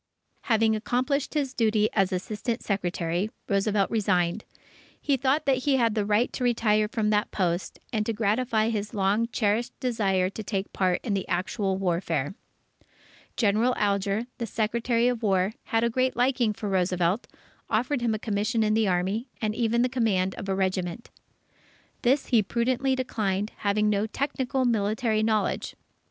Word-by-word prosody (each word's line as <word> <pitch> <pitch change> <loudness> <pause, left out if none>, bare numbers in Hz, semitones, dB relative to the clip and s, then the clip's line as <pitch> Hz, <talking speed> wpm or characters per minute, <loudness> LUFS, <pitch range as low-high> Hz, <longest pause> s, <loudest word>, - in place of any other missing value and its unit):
Having 225 -1 +3
accomplished 255 +7 -1
his 280 -3 0
duty 215 -3 +2
as 195 -2 +2
Assistant 215 +5 -3
Secretary, 180 -1 -1 0.2
Roosevelt 200 0 +1
resigned. 185 -3 +1 0.6
He 285 - +1
thought 270 +3 +1
that 270 -1 +3
he 270 +2 +1
had 230 -4 +2
a 210 - +1
right 210 +4 +1
to 255 - -3
retire 215 -3 +2
from 215 -1 0
that 210 0 +1
post, 175 -2 -1 0.2
and 215 -2 +1
to - - +1
gratify 220 +1 +1
his 210 -2 -3
long 205 +3 +2
cherished 225 +3 0
desire 200 -7 +1
to 220 - -6
take 195 -1 -3
part 185 -2 +1
in 215 - -1
the 195 -1 -2
actual 190 +2 -1
warfare. 170 -5 -1 1.0
General 225 +3 +2
Alger, 200 +2 0
the 235 - -2
Secretary 230 +2 +1
of 245 -2 0
War, 195 -1 +1
had 225 -2 +1
a 235 - +3
great 255 +2 +1
liking 245 -2 +2
for 210 0 -5
Roosevelt, 185 +1 +1 0.4
offered 245 +4 0
him 230 -2 +1
a - - -2
commission 215 +2 0
in 215 0 +2
the 220 -1 +2
Army, 190 +7 0
and 215 -1 -1
even 235 +1 +1
the - - +3
command 210 -7 +1
of 195 - -7
a 190 - +1
regiment. 190 +2 -2 0.9
This 265 +4 +2
he 235 -4 +5
prudently 250 +5 0
declined, 210 -5 -1
having 210 +1 +1
no 210 +1 +1
technical 265 +1 -1
military 220 0 +1
knowledge. 215 -1 0
215 Hz, 160 wpm, -26 LUFS, 195-240 Hz, 1.0 s, he